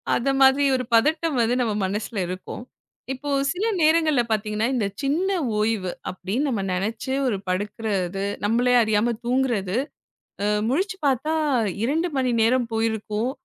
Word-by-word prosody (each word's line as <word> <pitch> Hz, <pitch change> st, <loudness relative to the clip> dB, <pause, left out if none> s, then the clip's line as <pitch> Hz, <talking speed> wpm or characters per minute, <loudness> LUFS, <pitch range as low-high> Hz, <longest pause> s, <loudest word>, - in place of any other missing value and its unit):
அத 245 Hz, -, 0 dB
மாதிரி 270 Hz, +1 st, +6 dB
ஒரு 255 Hz, -, -1 dB
பதட்டம் 310 Hz, +6 st, +3 dB
வந்து, 230 Hz, +2 st, +2 dB
நம்ம 225 Hz, -3 st, 0 dB
மனசுல 210 Hz, +3 st, -3 dB
இருக்கும். 185 Hz, +5 st, -6 dB, 0.5 s
இப்போ 280 Hz, +3 st, -6 dB, 0.2 s
சில 370 Hz, +5 st, -2 dB, 0.2 s
நேரங்கள்ல 310 Hz, -4 st, +4 dB
பாத்தீங்கன்னா, 215 Hz, +1 st, 0 dB
இந்தச் 200 Hz, -4 st, -2 dB
சின்ன 315 Hz, +8 st, +1 dB, 0.3 s
ஓய்வு 210 Hz, -4 st, 0 dB, 0.2 s
அப்படின்னு 195 Hz, +10 st, -2 dB
நம்ம 225 Hz, -6 st, -1 dB
நெனைச்சு 215 Hz, +8 st, -2 dB
ஒரு 220 Hz, -5 st, 0 dB
படுக்கிறது, 195 Hz, -1 st, -2 dB, 0.2 s
நம்மளே 240 Hz, +4 st, +2 dB
அறியாம 220 Hz, +2 st, +1 dB
தூங்குறது. 240 Hz, -6 st, 0 dB, 0.7 s
அ -, -, +1 dB, 0.2 s
முழிச்சு 365 Hz, -, 0 dB
பாத்தா 275 Hz, +4 st, +1 dB, 0.5 s
2 320 Hz, +8 st, +1 dB
மணி 260 Hz, -2 st, +1 dB
நேரம் 240 Hz, +1 st, +2 dB
போயிருக்கும். 220 Hz, +1 st, -1 dB
230 Hz, 135 wpm, -24 LUFS, 210-270 Hz, 0.7 s, மாதிரி